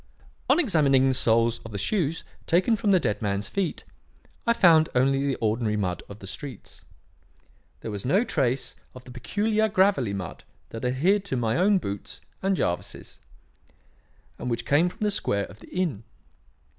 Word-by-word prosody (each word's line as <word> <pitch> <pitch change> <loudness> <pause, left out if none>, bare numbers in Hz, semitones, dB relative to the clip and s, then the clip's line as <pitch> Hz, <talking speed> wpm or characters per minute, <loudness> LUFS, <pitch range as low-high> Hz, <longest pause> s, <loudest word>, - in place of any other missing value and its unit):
On - - +5
examining 145 - +3
the 130 - +2
soles 115 -1 +3
of 115 - -11
the 100 - -4
shoes 165 - -1 0.2
taken 185 +7 +3
from 215 -1 -1
the 190 -2 +5
dead 105 -9 -2
man's 100 -1 -1
feet, 195 -4 -3 0.6
I 235 - +5
found 165 -7 +5
only 135 +2 +2
the 135 - 0
ordinary 110 -1 0
mud 90 -3 -2
of 100 - -9
the 100 - -11
streets. 125 +4 -9 1.0
There 110 - -5
was 100 -1 -6
no 185 - +2
trace 135 - -1 0.2
of 125 - -11
the 125 - -12
peculiar 215 - 0
gravelly 190 - +2
mud 90 -3 -7 0.3
that 115 - -8
adhered 165 +11 +2
to 175 -10 -2
my 115 -2 0
own 195 +3 +4
boots 100 - -6 0.2
and 195 0 +1
Jervis's, 85 - -4 1.2
and 125 - -4
which 115 0 -2
came 160 +5 +3
from - - -17
the 210 -1 +1
square 100 - 0
of 105 - -14
the - - -15
inn. 170 - -2
135 Hz, 170 wpm, -26 LUFS, 110-185 Hz, 1.2 s, On